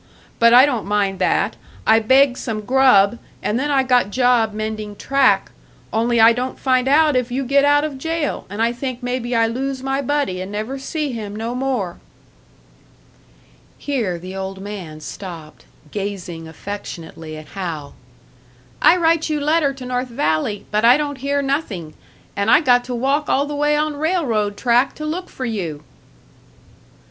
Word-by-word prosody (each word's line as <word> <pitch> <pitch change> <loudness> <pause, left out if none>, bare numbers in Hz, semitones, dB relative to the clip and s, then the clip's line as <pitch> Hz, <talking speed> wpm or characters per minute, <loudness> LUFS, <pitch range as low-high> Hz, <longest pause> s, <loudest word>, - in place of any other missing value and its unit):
But 235 0 +6
I 250 +3 +8
don't 245 -8 -2
mind 200 -2 0
that, 185 - +1 0.3
I 220 0 +5
begged 260 +3 +4
some 220 -3 -3
grub, 235 -3 +4 0.2
and 220 +4 0
then 290 +2 -1
I 275 -2 +3
got 250 -5 +2
job 245 -1 +2
mending 215 -1 -5
track; 275 +4 +2 0.4
only 235 +1 +1
I 225 +1 +7
don't 250 +2 -3
find 255 -1 +1
out 300 +1 +4
if 250 -1 0
you 265 +2 -2
get 280 +2 +3
out 290 0 +4
of 290 -3 -4
jail, 325 0 -2
and 205 +3 -2
I 230 - +2
think 250 0 -5
maybe 245 -1 -2
I 230 0 +4
lose 260 +3 -3
my 270 +1 -1
buddy 280 -10 -1
and 185 +2 -6
never 215 +6 -4
see 300 +1 -3
him 210 -4 -6
no 225 +2 -3
more." 250 -9 -2 1.8
Here 230 -11 -2
the 185 +3 -8
old 190 0 -5
man 190 -6 -8
stopped, 165 -4 -9 0.3
gazing 185 -5 -5
affectionately 165 -3 -8
at 155 -1 -11
Hal. 165 -7 -5 0.9
"I 360 - +6
write 325 -2 +2
you 305 -1 0
letter 300 0 +2
to 260 -2 -9
North 250 +1 -2
Valley, 200 -1 -1
but 210 +1 +1
I 245 +3 +7
don't 290 -2 -3
hear 280 +2 -1
nothing, 230 - -3 0.4
and 200 +2 0
I 300 - +6
got 245 -4 +4
to 250 - -4
walk 275 +5 0
all 280 - +2
the 295 - -5
way 295 +1 +1
on 305 0 0
railroad 270 - 0
track 245 +1 +2
to 305 - -6
look 350 +4 -4
for 255 - -6
you." 170 -10 -4
245 Hz, 170 wpm, -20 LUFS, 205-275 Hz, 1.8 s, I